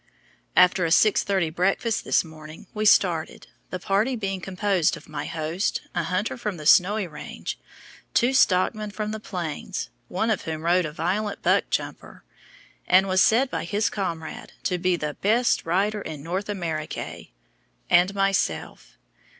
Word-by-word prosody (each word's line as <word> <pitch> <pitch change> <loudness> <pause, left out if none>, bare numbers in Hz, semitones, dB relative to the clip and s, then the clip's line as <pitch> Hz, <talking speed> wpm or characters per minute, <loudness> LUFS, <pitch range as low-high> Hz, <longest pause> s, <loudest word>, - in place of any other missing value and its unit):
After 180 0 +5
a 165 - +1
6:30 190 -2 +3
breakfast 195 +6 0
this - - +3
morning, 155 -1 -12
we 215 0 -2
started, 175 -6 +3 0.2
the 185 - -3
party 200 +8 +1
being 195 -4 -3
composed 190 -2 0
of - - -15
my 150 -2 -5
host, 165 +4 -2
a 175 - 0
hunter 185 +5 -1
from 210 -6 -4
the 150 - -9
Snowy 195 +6 +5
Range, 155 -4 -7 0.6
two 250 +1 +3
stockmen 210 -1 +2
from 210 +1 -4
the 220 - -4
Plains, 180 -2 -5 0.2
one 220 +5 0
of 215 - 0
whom 160 -1 -5
rode 175 +1 +3
a - - -7
violent 195 +6 -2
buck - - +2
jumper, - - -4 0.6
and 190 +2 +5
was 190 0 +3
said 255 +4 +4
by - - -2
his 205 +5 0
comrade 170 -5 -5
to 180 -1 0
be 180 0 +2
the 150 -3 -4
"best 230 -1 +2
rider 200 +5 +1
in 155 -6 -7
North 185 +5 -3
Americay," 165 -7 -4 0.6
and 180 +3 +4
myself. 195 -1 -1
185 Hz, 155 wpm, -25 LUFS, 165-210 Hz, 0.6 s, After